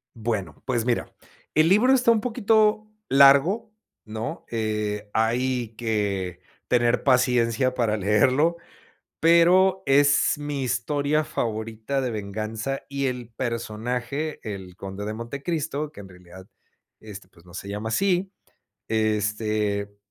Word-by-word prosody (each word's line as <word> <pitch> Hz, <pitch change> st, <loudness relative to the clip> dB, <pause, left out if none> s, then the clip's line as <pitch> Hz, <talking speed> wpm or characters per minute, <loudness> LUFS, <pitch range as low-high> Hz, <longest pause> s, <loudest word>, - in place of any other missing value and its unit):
Bueno, 105 Hz, -8 st, -4 dB
pues 120 Hz, -3 st, 0 dB
mira, 120 Hz, -1 st, -1 dB, 0.4 s
el 155 Hz, +1 st, +4 dB
libro 215 Hz, +8 st, +5 dB
está 250 Hz, -3 st, +4 dB
un 230 Hz, -2 st, +4 dB
poquito 215 Hz, -2 st, +2 dB, 0.2 s
largo, 140 Hz, +12 st, +5 dB, 0.3 s
¿no?, 110 Hz, +1 st, -6 dB
eh, 105 Hz, -2 st, -2 dB
hay 120 Hz, +2 st, 0 dB
que 100 Hz, -6 st, -2 dB, 0.3 s
tener 120 Hz, 0 st, +2 dB
paciencia 125 Hz, -1 st, +2 dB
para 115 Hz, -4 st, 0 dB
leerlo, 130 Hz, -, +2 dB, 0.6 s
pero 180 Hz, +3 st, +4 dB
es 140 Hz, +1 st, +4 dB
mi 145 Hz, -2 st, -4 dB
historia 140 Hz, +5 st, 0 dB
favorita 110 Hz, +3 st, -3 dB
de 125 Hz, -2 st, -2 dB
venganza, 110 Hz, +5 st, -4 dB
y 140 Hz, -1 st, -2 dB
el 125 Hz, -2 st, -4 dB
personaje, 120 Hz, +5 st, -3 dB
el 95 Hz, -4 st, -7 dB
Conde 95 Hz, +1 st, -6 dB
de 105 Hz, -, -3 dB
Montecristo, 140 Hz, +5 st, -4 dB
que -, -, -13 dB
en 100 Hz, -1 st, -10 dB
realidad, 90 Hz, +1 st, -14 dB, 0.5 s
este, 100 Hz, -3 st, -10 dB
pues, 85 Hz, -2 st, -23 dB
no 90 Hz, -, -16 dB
se 95 Hz, -, -7 dB
llama 105 Hz, +2 st, -4 dB
así, 190 Hz, -, +1 dB, 0.6 s
este 105 Hz, -1 st, -1 dB
120 Hz, 120 wpm, -24 LUFS, 105-145 Hz, 0.6 s, libro